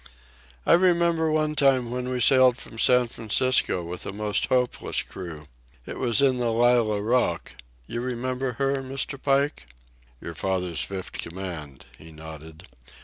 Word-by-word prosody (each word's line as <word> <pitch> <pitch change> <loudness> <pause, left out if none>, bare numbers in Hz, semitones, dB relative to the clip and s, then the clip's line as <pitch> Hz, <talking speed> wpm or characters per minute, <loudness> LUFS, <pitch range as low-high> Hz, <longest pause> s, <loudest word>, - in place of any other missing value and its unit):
"I - - +5
remember 170 -2 +3
one 155 0 +1
time 130 -5 +3
when 125 0 -3
we 125 -1 -2
sailed 130 -1 +5
from 115 - -9
San 125 +1 +4
Francisco 115 -4 +1
with 85 +1 -6
a - - -3
most 105 +1 -1
hopeless 125 -1 0
crew. 85 -5 -9 0.4
It - - -7
was 125 +2 +2
in 130 -2 +3
the 120 -1 0
Lallah 115 -3 +2
Rookh—you 85 - -2
remember 125 +1 -3
her, 135 +3 0
Mr. 135 +1 -4
Pike?" 140 - 0 0.5
"Your 85 - -7
father's 90 -1 -2
fifth 95 -2 -6
command," 85 -6 -7
he 80 +1 -13
nodded. 80 0 -11
120 Hz, 145 wpm, -25 LUFS, 90-130 Hz, 0.5 s, I